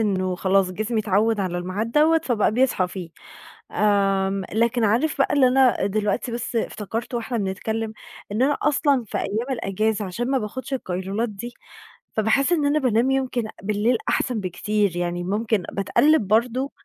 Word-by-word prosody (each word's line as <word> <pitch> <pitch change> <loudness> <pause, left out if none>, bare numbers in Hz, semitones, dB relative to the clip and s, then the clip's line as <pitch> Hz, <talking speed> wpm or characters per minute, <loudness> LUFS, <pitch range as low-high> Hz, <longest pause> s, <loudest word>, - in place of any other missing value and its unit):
إنه 185 -4 0
خلاص 190 0 +2
جسمي 215 +4 -1
اتعوّد 210 +1 +1
على 175 -2 -2
الميعاد 200 +6 -3
دوّة 320 +2 +4
فبقى 220 -4 +1
بيصحى 240 -7 +2
فيه، 180 -3 -7 0.6
آمم، 195 -2 +1
لكن 235 +1 +1
عارف 245 +10 +1
بقى 275 - +2
اللي 270 -3 +5
أنا 255 -5 +3
دلوقتي 210 +3 -1
بس 235 +1 -4
افتكرته 225 +2 -3
واحنا 235 +1 -3
بنتكلم 220 +3 -3 0.4
إن 215 +4 -1
أنا 285 +2 +3
أصلًا 285 -3 +2
في - - -3
أيام 230 +6 -2
الأجازة 215 -2 -1
عشان 235 +8 -3
ما 270 - +3
باخدش 255 +4 -5
القيلولات 195 0 -2
دي، 235 +4 -7 0.6
فباحس 225 +9 +2
إن 305 -4 +2
أنا 295 +2 +2
بانام 250 0 +2
يمكن 260 -3 0 0.2
بالليل 215 +4 +1
أحسن 245 -4 0
بكتير، 200 0 -1
يعني 175 0 -2
مُمكن 210 +1 0
باتقلّب 220 +4 +2
برضو 245 +5 +1
220 Hz, 155 wpm, -23 LUFS, 195-250 Hz, 0.6 s, اللي